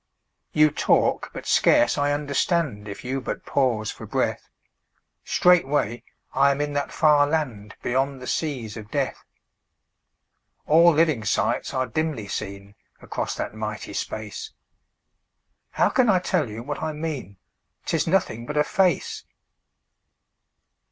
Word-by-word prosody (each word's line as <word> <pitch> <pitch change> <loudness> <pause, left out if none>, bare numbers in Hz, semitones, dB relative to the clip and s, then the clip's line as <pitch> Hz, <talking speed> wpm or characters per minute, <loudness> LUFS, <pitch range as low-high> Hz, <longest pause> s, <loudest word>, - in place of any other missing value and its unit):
You 155 0 +4
talk, - - +2
but - - -8
scarce 120 - +4
I 145 0 +1
understand; 145 - 0
If 100 - -8
you 135 +2 -2
but - - -5
pause 120 -6 +1
for - - -10
breath, - - -1 0.7
Straightway 145 -9 +2 0.3
I 140 +1 +4
am 140 0 0
in 145 0 -1
that 145 0 -2
far 150 -2 +4
land 130 -10 -2
Beyond 135 +2 0
the 125 - -8
seas 125 -8 -3
of 105 -2 -9
Death. - - -2 1.4
All 165 +3 +6
living 155 -7 +2
sights - - 0
are 130 0 0
dimly 135 -3 -2
seen 100 0 -6 0.3
Across - - -4
that - - -4
mighty 110 0 -5
space 110 -2 -5 1.2
How - - +2
can 250 -3 +3
I 190 - +5
tell 155 -7 0
you 110 +2 -7
what 145 +2 -5
I 155 -1 -2
mean? 150 -10 -5 0.5
'Tis 165 -1 0
nothing 140 -10 0
but 150 - -3
a 150 - +5
face. 185 +3 0
140 Hz, 135 wpm, -24 LUFS, 110-155 Hz, 1.4 s, All